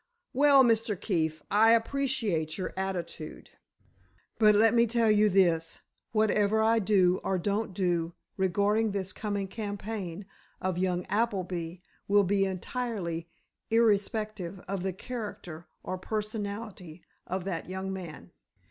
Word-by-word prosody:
Well, 280 0 +6
Mr. 225 -5 +2
Keefe, 160 -5 -1
I 220 +2 +6
appreciate 230 - 0
your 185 - -4
attitude, 180 -5 -5 0.9
but 210 -2 +6
let 225 +2 +5
me 235 0 +4
tell 230 -1 +3
you 210 0 +4
this: 175 -4 +2 0.3
whatever 215 -1 +2
I 225 +1 +4
do 185 -3 +3
or 190 - 0
don't 205 +4 -1
do 175 -3 -1 0.2
regarding 205 +3 +1
this 190 -2 -3
coming 205 -2 -3
campaign 205 -3 -5 0.3
of 185 -1 -2
young 180 -1 0
Appleby 185 -5 -2 0.2
will 205 0 +5
be 195 +1 +2
entirely 190 -4 -3 0.4
irrespective 215 -4 +1
of 195 -1 -2
the 190 +1 -1
character 185 -6 -7 0.2
or 185 - -4
personality 205 -4 -5 0.2
of 185 0 -3
that 180 -2 -4
young 190 +1 -4
man. 175 -6 -8
200 Hz, 125 wpm, -29 LUFS, 180-220 Hz, 0.9 s, Well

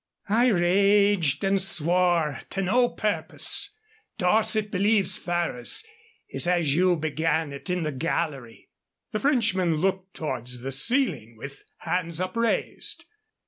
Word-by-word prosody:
"I 235 +4 +3
raged 200 - +3
and 195 0 +2
swore 175 -4 +1
to 195 - -2
no 245 +6 +2
purpose. 215 - -1 0.5
Dorset 215 +2 +1
believes 200 0 +1
Ferrers. 175 - -2 0.4
He - - -7
says 175 -5 +2
you 180 +1 +3
began 160 -1 -1
it 140 +7 -9
in 180 -1 -1
the 155 - -2
gallery." 135 -4 -4 0.4
The 215 - -2
Frenchman 225 - +1
looked 190 +3 -2
towards 125 -5 -4
the 135 +2 -5
ceiling 150 - +1
with 140 +4 -10 0.2
hands 170 -2 -2
upraised. 225 +6 -2
180 Hz, 120 wpm, -25 LUFS, 155-205 Hz, 0.5 s, I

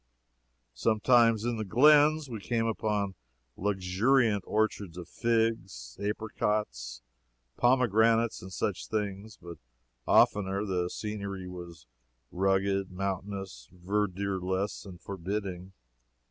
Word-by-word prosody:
Sometimes, 115 - +3
in 120 -1 -1
the 110 - -2
glens, 150 +7 +5
we 115 -4 -6
came 115 +2 -1
upon 105 -3 -1 0.4
luxuriant 105 +4 +1
orchards 105 -5 -1
of 90 -2 -7
figs, 110 - -1
apricots, 100 - -2 0.5
pomegranates, 115 -2 +3
and 95 - -9
such 90 - -2
things, 105 0 -4
but 85 -1 -10 0.5
oftener 100 0 +3
the 90 -3 -1
scenery 100 -3 -5
was 85 -4 -9 0.5
rugged, 95 +1 +1
mountainous, 95 -7 -5
verdureless 95 +1 -2
and 90 -2 -10
forbidding. 95 -1 -5
100 Hz, 95 wpm, -29 LUFS, 95-110 Hz, 0.5 s, glens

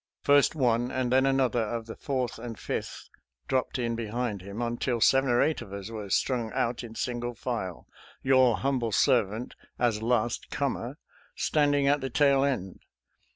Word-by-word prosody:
First 145 +2 +4
one 120 -3 +2
and 130 -1 -1
then 130 +1 +4
another 130 -3 +2
of 115 +1 -3
the 115 - -8
Fourth 130 -5 -3
and 115 -2 -7
Fifth - - -5 0.4
dropped 130 0 0
in 120 -2 -1
behind 115 -2 -3
him, 100 +3 -8
until 120 0 -1
seven 135 +3 +4
or 120 0 +4
eight 160 - 0
of 95 - -10
us 100 +2 -6
were 105 -3 -6
strung 120 +2 0
out 120 +1 -1
in 115 -1 -9
single 120 0 -3
file, 115 -7 -4 0.4
your 130 -4 +4
humble 130 -4 0
servant, 115 -1 +1 0.2
as 115 -3 +1
last 120 0 0
comer, - - -2 0.4
standing 145 -2 +2
at 145 +1 +3
the 135 - -3
tail 140 +1 +3
end. 125 -10 -2
120 Hz, 165 wpm, -28 LUFS, 115-130 Hz, 0.4 s, First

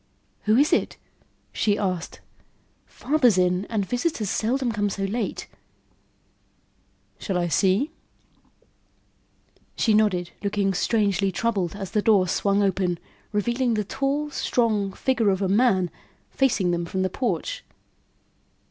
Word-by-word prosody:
"Who 215 +2 +4
is 290 +3 +4
it?" - - 0 0.6
she 205 -1 +1
asked. 185 -5 -3 0.7
"Father's 255 -8 +2
in 180 +1 +2
and 210 -3 -2
visitors 245 - -1
seldom 245 +2 0
come 205 -2 0
so 195 0 -4
late." 210 +2 -3 1.7
"Shall 190 -4 -2
I 175 -1 0
see?" 195 - +2 1.8
She 220 - +2
nodded, 190 -5 +2
looking 200 -1 0
strangely 200 -1 +1
troubled 195 -2 -1
as 195 -2 -6
the 215 - +1
door 205 -4 +4
swung 200 +3 +1
open, 185 -2 0 0.3
revealing 235 +3 0
the 210 - 0
tall, 275 +7 -2
strong 215 -8 0
figure 245 -3 +1
of 190 -1 +1
a - - +1
man 195 -3 +2 0.4
facing 220 -9 +1
them 170 0 -1
from 190 +2 -2
the 185 - 0
porch. 195 - -2
205 Hz, 125 wpm, -24 LUFS, 190-235 Hz, 1.8 s, Who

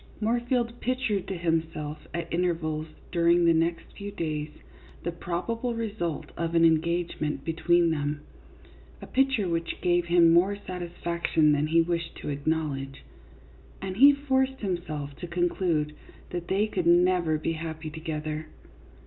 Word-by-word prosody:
Moorfield 240 +1 0
pictured 245 -6 -1
to 190 - -3
himself 160 -3 -2
at 170 -1 -4
intervals 165 -3 -1 0.2
during 170 0 +4
the 165 - +6
next 165 +1 +1
few 205 0 -6
days 155 -5 -3 0.5
the 170 - -1
probable 225 +8 -3
result 205 -8 -3
of 170 0 -2
an 165 0 +6
engage 170 +2 +1
ment 150 -2 -2
between 170 +1 +3
them 145 -1 -2 0.8
(a - - -9
picture 265 -7 +2
which 165 -1 -2
gave 175 -1 +2
him 170 -1 +5
more 185 +4 +4
satisfaction 170 -3 0
than 150 +1 +2
he 165 +1 +4
wished 170 0 -2
to - - -6
acknowledge), 140 -2 -2 0.8
and 190 0 -5
he 280 +4 +9
forced 265 -2 0
himself 155 -7 -3
to 175 - -6
conclude 170 -3 0 0.4
that 175 -1 -4
they 195 +3 +2
could 185 -5 -2
never 175 -2 +4
be 155 +2 -2
happy 160 -1 -5
together. 155 -1 -4
170 Hz, 140 wpm, -27 LUFS, 160-185 Hz, 0.8 s, he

